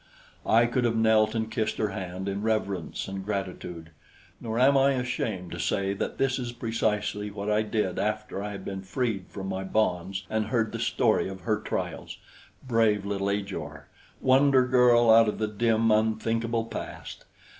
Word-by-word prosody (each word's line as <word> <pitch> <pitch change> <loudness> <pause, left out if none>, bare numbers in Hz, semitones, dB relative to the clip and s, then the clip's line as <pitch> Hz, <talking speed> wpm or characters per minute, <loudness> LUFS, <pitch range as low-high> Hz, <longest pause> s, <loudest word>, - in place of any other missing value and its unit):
I 115 +1 +5
could 120 +1 0
have 115 -1 +1
knelt 110 0 +3
and 110 0 -2
kissed 110 - -1
her 105 - 0
hand 95 0 -5
in 100 +1 -2
reverence 100 -5 -2
and 95 0 -5
gratitude; 90 -5 -5 0.5
nor 115 0 -4
am 135 +3 +5
I 135 +1 +4
ashamed 120 -8 -3
to - - -6
say 100 0 0
that 100 - -4
that 135 -1 +1
is 120 -2 -4
precisely 105 -3 -1
what 100 +1 -4
I 105 +1 +3
did 105 -4 -1
after 105 -1 -2
I 105 - -4
had 100 -2 -7
been 95 -1 -4
freed 100 -1 -2
from 95 -2 -7
my 95 0 -3
bonds 95 -1 -1
and 110 -1 -1
heard 110 -1 0
the - - -5
story - - +1
of 95 -1 -8
her 110 0 0
trials. - - -4 0.5
Brave 110 -4 +2
little 100 -1 -1
Ajor! 100 -1 -4 0.3
Wonder 130 0 +4
girl 120 -2 +5
out 115 -1 +7
of - - -4
the 110 - -1
dim, 115 +1 +2
unthinkable 115 +1 +1
past! - - -8
110 Hz, 175 wpm, -27 LUFS, 100-115 Hz, 0.5 s, out